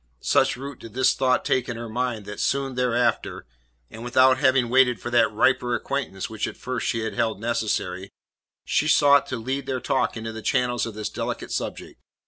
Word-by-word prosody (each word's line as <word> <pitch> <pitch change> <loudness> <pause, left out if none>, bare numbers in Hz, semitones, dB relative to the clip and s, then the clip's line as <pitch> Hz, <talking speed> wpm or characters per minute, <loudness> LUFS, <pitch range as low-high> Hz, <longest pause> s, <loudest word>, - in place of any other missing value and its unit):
Such - - +2
root 140 0 -8
did 115 0 -12
this 130 0 +3
thought 130 -1 +1
take 130 -1 0
in 120 - -4
her 115 0 -6
mind 115 -2 -3
that 105 - -8
soon 135 -1 0
thereafter 125 -1 0 0.5
and 115 - -9
without 130 +1 +4
having 130 -2 +3
waited 125 0 +3
for 120 - -6
that 120 - +4
riper 120 +2 +2
acquaintance 130 -10 -3
which 110 -1 -3
at - - -8
first 125 -1 -3
she 115 - -1
had 110 0 -3
held 110 -3 -1
necessary 100 -4 -2 0.6
she 155 - +1
sought 145 -2 +5
to 125 - -3
lead 130 +4 -4
their 130 -1 -1
talk 125 -1 0
into 110 0 -5
the 110 - -7
channels 125 0 0
of 110 - -8
this 105 -1 -3
delicate - - -5
subject. - - -5
120 Hz, 195 wpm, -24 LUFS, 110-130 Hz, 0.6 s, sought